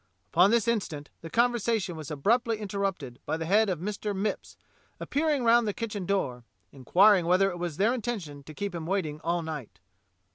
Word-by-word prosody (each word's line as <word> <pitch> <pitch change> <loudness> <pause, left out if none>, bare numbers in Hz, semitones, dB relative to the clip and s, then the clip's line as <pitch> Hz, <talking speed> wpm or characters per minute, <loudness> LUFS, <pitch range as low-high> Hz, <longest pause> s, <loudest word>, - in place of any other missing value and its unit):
Upon 180 +4 +6
this 230 -1 +2
instant 165 -11 -2
the 165 - -8
conversation 230 -4 +1
was 155 -2 -7
abruptly 225 - +1
interrupted 195 - -3
by 160 - -1
the 165 - -4
head 210 +5 +3
of 180 - -1
Mr. 205 +2 -3
Mipps 205 +2 -3 0.4
appear 315 +3 -1
ing 285 -4 +1
round 235 0 +4
the 205 - -2
kitchen 210 -5 -4
door, 130 -12 -1 0.3
inquiring 180 - +4
whether 190 +2 +3
it 175 - -7
was 170 -4 -4
their 215 +5 +3
intention 205 - -4
to 155 - -10
keep 200 +2 -4
him 165 -2 -5
waiting 160 -6 -2
all 170 0 0
night. 145 - -7
195 Hz, 185 wpm, -28 LUFS, 160-220 Hz, 0.4 s, Upon